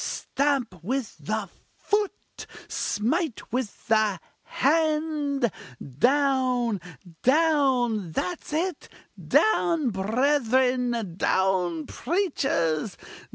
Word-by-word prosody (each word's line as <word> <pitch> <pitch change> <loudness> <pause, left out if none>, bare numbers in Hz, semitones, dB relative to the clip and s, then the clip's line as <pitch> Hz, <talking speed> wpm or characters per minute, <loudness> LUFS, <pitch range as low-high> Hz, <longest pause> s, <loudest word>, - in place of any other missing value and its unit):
stamp 275 -7 -1
with 255 +2 -2
the 215 -1 -3 0.3
foot! 415 -1 -2 0.2
smite 250 - -2
with 250 -4 -3
the 215 -4 +2 0.2
hand! 300 -3 +1 0.5
down! 255 - +2 0.4
down! 260 - +2
that's 350 - -3
it 330 +1 -2 0.3
down 335 - +2
brethren! 245 - +1
down 180 -4 +1
preachers! 265 - -1
255 Hz, 70 wpm, -26 LUFS, 215-295 Hz, 0.5 s, the